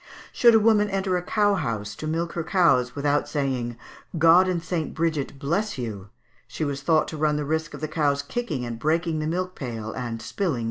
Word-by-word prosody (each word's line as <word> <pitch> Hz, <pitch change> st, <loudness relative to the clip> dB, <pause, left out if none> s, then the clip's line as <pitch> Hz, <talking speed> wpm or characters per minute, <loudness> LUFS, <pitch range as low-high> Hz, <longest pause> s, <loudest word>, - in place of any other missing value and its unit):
Should 235 Hz, -2 st, +6 dB
a -, -, +7 dB
woman 210 Hz, -1 st, +4 dB
enter 195 Hz, -1 st, 0 dB
a 180 Hz, -, 0 dB
cow 205 Hz, +3 st, +2 dB
house 105 Hz, -, -2 dB
to 155 Hz, -, -5 dB
milk 165 Hz, +2 st, -2 dB
her 170 Hz, -, -2 dB
cows 160 Hz, -9 st, +2 dB
without 145 Hz, +1 st, 0 dB
saying 130 Hz, -5 st, -2 dB, 0.4 s
"God 165 Hz, +3 st, +6 dB
and 175 Hz, -2 st, -1 dB
St. 165 Hz, -2 st, -3 dB
Bridget 155 Hz, -4 st, -1 dB
bless 170 Hz, +9 st, -1 dB
you!" 105 Hz, -6 st, -5 dB, 0.4 s
she 155 Hz, +5 st, -3 dB
was 140 Hz, -1 st, -3 dB
thought 155 Hz, +2 st, +2 dB
to 155 Hz, -, -6 dB
run 150 Hz, 0 st, +1 dB
the 150 Hz, 0 st, -2 dB
risk 160 Hz, +2 st, -2 dB
of -, -, -10 dB
the 155 Hz, -, -1 dB
cows 145 Hz, -3 st, 0 dB
kicking 145 Hz, -, -3 dB
and 115 Hz, -1 st, -5 dB
breaking 160 Hz, +3 st, 0 dB
the 155 Hz, -, -2 dB
milk 185 Hz, +3 st, -2 dB
pail 115 Hz, -7 st, -5 dB
and 120 Hz, -2 st, -4 dB
spilling 170 Hz, -, -2 dB
the -, -, -3 dB
milk. -, -, -3 dB
155 Hz, 220 wpm, -25 LUFS, 135-180 Hz, 0.4 s, a